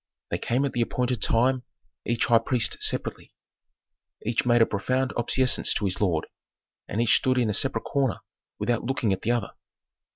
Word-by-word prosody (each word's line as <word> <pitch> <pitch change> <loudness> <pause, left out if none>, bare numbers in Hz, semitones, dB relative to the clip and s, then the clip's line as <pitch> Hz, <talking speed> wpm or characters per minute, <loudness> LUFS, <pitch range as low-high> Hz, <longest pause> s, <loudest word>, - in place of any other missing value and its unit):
They - - -1
came 125 +4 0
at 140 - -2
the 120 - 0
appointed 125 0 -1
time, 125 +3 +2 0.5
each 120 0 +1
high 115 -1 +5
priest 115 0 0
separately. - - -1 0.9
Each 115 +2 0
made 120 -1 +5
a - - +3
profound 130 +6 -1
obeisance 125 +2 +1
to 105 - -1
his 95 +1 -1
lord, 85 -6 +1 0.6
and 105 - -3
each 115 -2 +4
stood 130 -2 0
in 120 -4 +2
a - - -2
separate 115 - +1
corner 135 -4 -1 0.4
without 120 -2 -1
looking 120 -4 0
at 95 - -4
the - - -3
other. 120 -4 0
120 Hz, 175 wpm, -26 LUFS, 110-125 Hz, 0.9 s, high